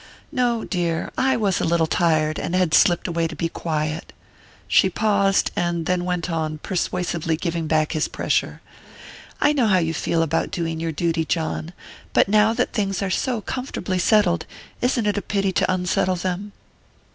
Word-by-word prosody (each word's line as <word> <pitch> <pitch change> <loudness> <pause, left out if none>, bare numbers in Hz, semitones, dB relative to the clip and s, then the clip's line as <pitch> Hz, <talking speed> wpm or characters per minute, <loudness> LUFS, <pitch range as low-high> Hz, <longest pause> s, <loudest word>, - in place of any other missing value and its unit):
"No, 245 -5 0
dear; 170 -3 -2
I 265 -1 +2
was 200 -5 +1
a - - 0
little 165 0 +2
tired, 155 -2 +1
and 175 - -2
had 180 -4 +1
slipped 175 +2 +4
away 170 -1 0
to 160 - -8
be 165 +2 -2
quiet." 155 -1 -3 0.5
She 190 - +4
paused, 200 0 +2
and 170 -1 -1
then 180 0 0
went 180 -2 -1
on, 160 -2 -2
persuasively 170 -2 -2
giving 170 -1 -2
back 155 -1 +1
his 155 - 0
pressure: - - -1 0.8
"I 295 - +4
know 255 -6 +2
how 190 -3 +4
you 165 -2 0
feel 165 +1 0
about 165 0 0
doing 165 -4 -3
your 165 0 -2
duty, 165 +1 0
John; 160 0 -2 0.4
but - - +4
now 210 +2 +4
that 245 +2 -1
things 200 -3 -1
are 190 - -2
so 240 +2 -1
comfortably 210 -6 -3
settled, 180 -2 +3 0.3
isn't 245 -2 +1
it 205 0 +1
a - - -7
pity 195 -2 0
to 185 - +1
unsettle 185 0 +1
them?" 185 +3 -3
175 Hz, 175 wpm, -22 LUFS, 165-200 Hz, 0.8 s, slipped